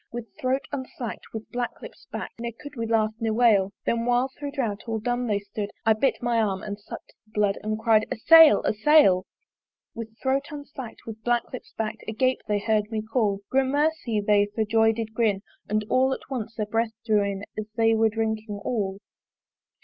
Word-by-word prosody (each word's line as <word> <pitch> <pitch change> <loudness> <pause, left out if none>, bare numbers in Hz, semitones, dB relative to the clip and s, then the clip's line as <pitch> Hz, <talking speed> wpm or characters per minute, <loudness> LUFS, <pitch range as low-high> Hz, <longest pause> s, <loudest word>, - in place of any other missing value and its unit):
With 235 -1 -7
throat 260 +1 0
unslack'd, 260 -4 -6
with 220 -1 -7
black 245 -1 -3
lips - - -12
bak'd - - -6
Ne 235 0 -3
could 290 0 -10
we 230 -2 -3
laugh, 220 -1 +2
ne 225 -1 0
wail: 215 -4 +4
Then 230 0 +1
while 245 +2 +2
thro' 290 -1 -5
drouth 235 -8 -2
all 225 -1 -1
dumb 245 +2 -1
they 210 -2 +1
stood 200 +1 -5 0.2
I 220 - +6
bit 240 +3 0
my 235 -1 +2
arm 195 -3 -1
and 205 -1 -5
suck'd 200 - -10
the - - -27
blood 205 -1 +1
And 215 0 -2
cry'd, 220 -1 +3
A - - 0
sail! 325 +6 +8
a - - +1
sail! 215 -6 +5 0.7
With 225 -1 -8
throat 270 +2 0
unslack'd, 285 -5 -8
with 220 -1 -8
black 240 0 +2
lips 255 - -8
bak'd 220 0 -3
Agape 255 +4 +1
they 210 -1 +1
hear'd 210 0 0
me 220 -2 -2
call: 220 -3 0
Gramercy! 270 -3 +1
they 205 0 +3
for 220 - +1
joy 225 +1 +4
did 225 -1 -4
grin 215 -4 +1 0.3
And 215 0 0
all 260 +3 +3
at 265 - -9
once 230 -3 -4
their 215 - -1
breath 225 +1 -1
drew 215 -2 +3
in 200 0 -3
As 215 0 -4
they 225 0 +4
were 225 0 +3
drinking 220 -1 -2
all. 200 -5 -1
225 Hz, 200 wpm, -25 LUFS, 215-245 Hz, 0.7 s, sail